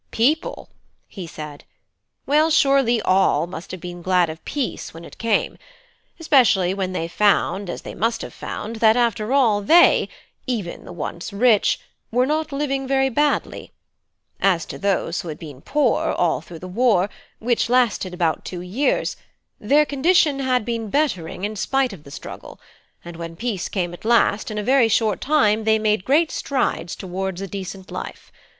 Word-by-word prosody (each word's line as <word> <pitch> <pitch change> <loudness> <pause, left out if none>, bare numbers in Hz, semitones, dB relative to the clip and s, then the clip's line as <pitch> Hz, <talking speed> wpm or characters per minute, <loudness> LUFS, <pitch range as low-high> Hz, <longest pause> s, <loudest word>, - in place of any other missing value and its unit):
"People?" 295 +9 0 0.4
he 185 -4 -8
said. 150 -2 -9 0.6
"Well, 305 +3 +3
surely 275 -7 +3
all 185 -2 +3
must 175 -1 -9
have 185 - -7
been 175 -1 -7
glad 180 -2 +2
of 160 - -12
peace 275 - -4
when 165 +1 -10
it - - -14
came; 230 -3 0 0.6
especially 235 - +3
when 190 -1 -2
they 165 -3 -2
found, 200 0 +1
as - - -6
they - - -7
must 230 +2 -1
have - - -8
found, 225 +2 -6
that 220 +1 +4
after 235 -1 0
all, 235 -7 +3
they 335 +12 +5 0.4
even 215 -9 -4
the - - -9
once 170 +2 -6
rich 215 +1 +3 0.3
were 250 +2 +2
not 310 +2 -1
living 275 -1 -2
very 270 0 +2
badly. 295 +4 -1 0.7
As 185 -4 +2
to - - -8
those 195 -3 0
who - - -10
had 155 - -5
been 145 -5 -10
poor, 275 - +1
all 170 -4 +1
through 165 +1 -11
the 185 - -9
war, 200 -1 +2 0.3
which 235 0 0
lasted 240 -7 +2
about 175 -3 -1
two 180 -2 -6
years, 205 +11 0 0.4
their 290 +8 +3
condition 295 0 +2
had 255 -4 +1
been 230 -2 -3
bettering, 195 - -1
in 210 +1 -2
spite 265 +3 0
of 155 -6 -13
the - - -11
struggle; - - -10 0.5
and 170 -1 -9
when 165 0 -7
peace 220 -3 -3
came 175 -3 -2
at 175 - -11
last, 230 0 +2
in 215 - -5
a 210 - -2
very 255 +1 +4
short 220 -2 +1
time 225 -7 +2
they 220 0 +3
made 215 -3 0
great 310 +4 +3
strides 250 - -2
towards 190 0 -4
a 195 - -4
decent 190 0 -7
life. - - -7
215 Hz, 170 wpm, -22 LUFS, 180-260 Hz, 0.7 s, they